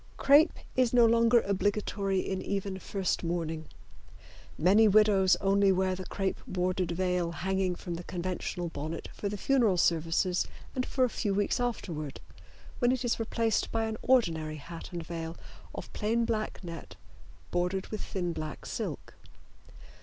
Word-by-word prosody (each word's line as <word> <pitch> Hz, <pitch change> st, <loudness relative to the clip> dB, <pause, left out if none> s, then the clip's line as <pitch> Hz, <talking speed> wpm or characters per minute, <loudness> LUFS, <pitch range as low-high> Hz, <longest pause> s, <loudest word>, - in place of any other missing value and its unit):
Crepe 290 Hz, +4 st, +6 dB, 0.2 s
is 255 Hz, -2 st, +2 dB
no 240 Hz, -1 st, +7 dB
longer 230 Hz, +1 st, +5 dB
obligatory 200 Hz, 0 st, 0 dB
in 190 Hz, -1 st, -3 dB
even 195 Hz, -1 st, -3 dB
first 190 Hz, -1 st, -2 dB
mourning. 165 Hz, -2 st, -2 dB, 0.9 s
Many 200 Hz, +7 st, +5 dB
widows 205 Hz, -2 st, +5 dB
only 195 Hz, 0 st, +3 dB
wear 190 Hz, 0 st, +1 dB
the 185 Hz, 0 st, -6 dB
crepe 195 Hz, -1 st, -2 dB
bordered 185 Hz, 0 st, -1 dB
veil 180 Hz, -1 st, 0 dB
hanging 190 Hz, +2 st, -1 dB
from 175 Hz, 0 st, -6 dB
the 170 Hz, +1 st, -5 dB
conventional 175 Hz, -1 st, -3 dB
bonnet 155 Hz, +2 st, -5 dB
for 200 Hz, -, -3 dB
the 205 Hz, -, -4 dB
funeral 230 Hz, -5 st, +3 dB
services 170 Hz, +2 st, +2 dB, 0.3 s
and 255 Hz, -1 st, -2 dB
for 260 Hz, -, +1 dB
a -, -, +5 dB
few 205 Hz, -4 st, -1 dB
weeks 205 Hz, +3 st, +1 dB
afterward, 170 Hz, -, -3 dB, 0.6 s
when 245 Hz, -1 st, +3 dB
it 255 Hz, -1 st, -1 dB
is 235 Hz, -, 0 dB
replaced 225 Hz, -1 st, 0 dB
by 225 Hz, 0 st, 0 dB
an 220 Hz, 0 st, -3 dB
ordinary 160 Hz, -12 st, +2 dB
hat 165 Hz, +3 st, -9 dB
and 170 Hz, -2 st, -5 dB
veil 165 Hz, 0 st, -5 dB, 0.4 s
of -, -, -8 dB
plain 230 Hz, +2 st, +1 dB
black 215 Hz, -3 st, -2 dB
net 170 Hz, -2 st, -8 dB, 0.6 s
bordered 180 Hz, +2 st, 0 dB
with 215 Hz, -, -4 dB
thin 175 Hz, -3 st, -2 dB
black 155 Hz, -2 st, -6 dB
silk. -, -, -5 dB
190 Hz, 155 wpm, -30 LUFS, 175-220 Hz, 0.9 s, no